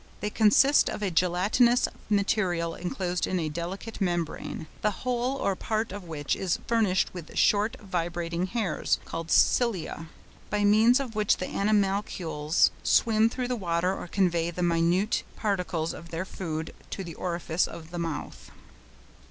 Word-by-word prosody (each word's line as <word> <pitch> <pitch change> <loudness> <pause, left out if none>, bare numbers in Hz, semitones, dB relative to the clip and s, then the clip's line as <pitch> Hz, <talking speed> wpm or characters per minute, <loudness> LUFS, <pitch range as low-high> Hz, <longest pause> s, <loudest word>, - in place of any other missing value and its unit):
They 210 - -3
consist 235 +8 +5
of 210 - -4
a 195 - 0
gelatinous 190 +8 +3 0.2
material 190 -5 +1
enclosed 180 0 -2
in 185 - 0
a 160 -2 -1
delicate 180 +8 -6
membrane, 175 -3 -2 0.2
the 210 - +3 0.2
whole 250 +1 0
or 195 -7 0
part 220 +2 -2
of 200 -1 -7
which 150 -4 -2
is 185 -3 -1
furnished 215 -6 +1
with 175 -4 -9
short 210 +2 +3
vibrating 175 -2 -2
hairs 200 -6 0
(called 165 0 -5
cilia), 185 -6 +2 0.4
by 210 0 0
means 220 +5 +5
of 260 -5 -4
which 210 -1 +2
the 185 - -3
animalcules 195 -6 +1
swim 225 0 +3
through 250 +1 -3
the 250 - 0
water 180 -2 0
or - - -7
convey 175 -3 +1
the 175 +1 -3
minute 175 +5 +2
particles 180 -6 -1
of 170 - -10
their 165 +3 -3
food 160 -4 -5 0.2
to 195 - -4
the 170 -2 -7
orifice 170 0 -1
of 165 0 -10
the 175 - -4
mouth. 165 -3 -5
185 Hz, 150 wpm, -27 LUFS, 170-210 Hz, 0.4 s, consist